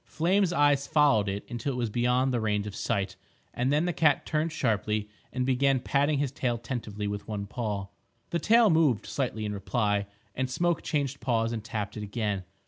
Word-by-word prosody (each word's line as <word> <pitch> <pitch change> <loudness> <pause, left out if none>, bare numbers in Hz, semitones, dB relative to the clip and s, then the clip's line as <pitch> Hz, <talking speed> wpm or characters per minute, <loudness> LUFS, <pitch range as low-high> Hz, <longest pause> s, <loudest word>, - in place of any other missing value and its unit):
Flame's 185 +3 +1
eyes 145 -3 +3
followed 140 -10 +4
it 100 +1 -4
until 120 +4 -3
it - - -4
was 120 -3 -1
beyond 125 +3 +2
the 120 - +1
range 105 -2 0
of 105 - -6
sight, 100 -4 -1 0.4
and 125 +2 0
then 150 +3 +2
the 175 - 0
cat 155 -3 +3
turned 155 +2 0
sharply 110 -7 0 0.2
and 125 0 -1
began 135 +1 +3
patting 140 +3 +1
his 140 -2 0
tail 125 -3 -1
tentatively 115 -3 -5
with 100 0 -4
one 105 -2 -3
paw. 105 -2 -3 0.5
The 170 - +1
tail 225 0 +5
moved 155 -9 +3
slightly 120 -5 -2
in 105 - -2
reply, 105 0 0 0.3
and 130 0 -2
Smoke 175 +5 0
changed 140 -3 -2
paws 115 -3 0
and 110 -2 -4
tapped 105 -2 -4
it - - -4
again. 105 -2 -2
125 Hz, 195 wpm, -28 LUFS, 105-145 Hz, 0.5 s, tail